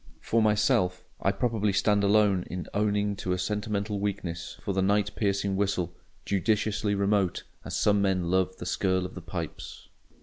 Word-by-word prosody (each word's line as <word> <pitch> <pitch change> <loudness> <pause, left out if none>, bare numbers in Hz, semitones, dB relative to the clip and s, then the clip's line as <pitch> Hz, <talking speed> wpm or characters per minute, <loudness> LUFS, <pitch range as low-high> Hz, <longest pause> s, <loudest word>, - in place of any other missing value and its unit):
For 115 - +1
myself, 105 -4 +2 0.2
I 95 - +3
probably 105 0 0
stand 100 +1 +2
alone 100 -2 +4
in 90 -1 -4
owning 105 0 +1
to 90 -1 -2
a - - -1
sentimental 105 +2 -2
weakness 95 -4 -4
for 100 - -1
the 95 - +1
night 100 +1 +2
piercing 100 -2 0
whistle—judiciously 100 +2 -1
remote, 100 -2 +1 0.2
as - - -5
some 105 -1 +3
men 95 -3 +1
love 95 0 +1
the - - -7
skirl 95 0 0
of 90 - -7
the 90 - -8
pipes. 85 -1 -7
100 Hz, 160 wpm, -28 LUFS, 95-105 Hz, 0.2 s, alone